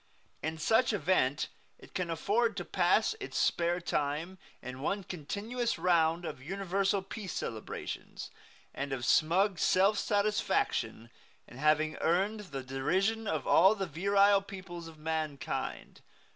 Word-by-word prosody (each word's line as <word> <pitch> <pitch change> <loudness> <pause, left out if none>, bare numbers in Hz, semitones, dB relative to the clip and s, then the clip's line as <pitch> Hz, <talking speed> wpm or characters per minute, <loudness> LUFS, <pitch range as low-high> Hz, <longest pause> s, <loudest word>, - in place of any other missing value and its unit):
In 160 +1 -3
such 225 +9 +3
event 160 -7 +1 0.3
it - - -17
can 180 -2 -2
afford 210 +7 +1
to 175 - -3
pass 190 - +2
its 400 - -5
spare 175 +1 +1
time 160 +3 -2 0.2
in 130 +1 -8
one 195 +7 -1
continuous 205 - -3
round 170 -1 +2
of 130 - -6
universal 195 +4 -1
peace 195 -1 -6
celebrations, 110 -1 -6 0.4
and 140 0 -3
of 125 -3 -3
smug 180 - +3
self 195 +6 +3
satisfaction 205 - 0 0.4
in 120 - -12
having 155 +1 +2
earned 195 +6 +1
the 135 -2 -5
derision 185 +13 0
of - - -1
all 190 +5 +6
the 195 -2 -2
virile 200 +4 +3
peoples 185 -4 -8
of 160 -1 -12
mankind. 155 -2 -4
180 Hz, 130 wpm, -31 LUFS, 155-200 Hz, 0.4 s, all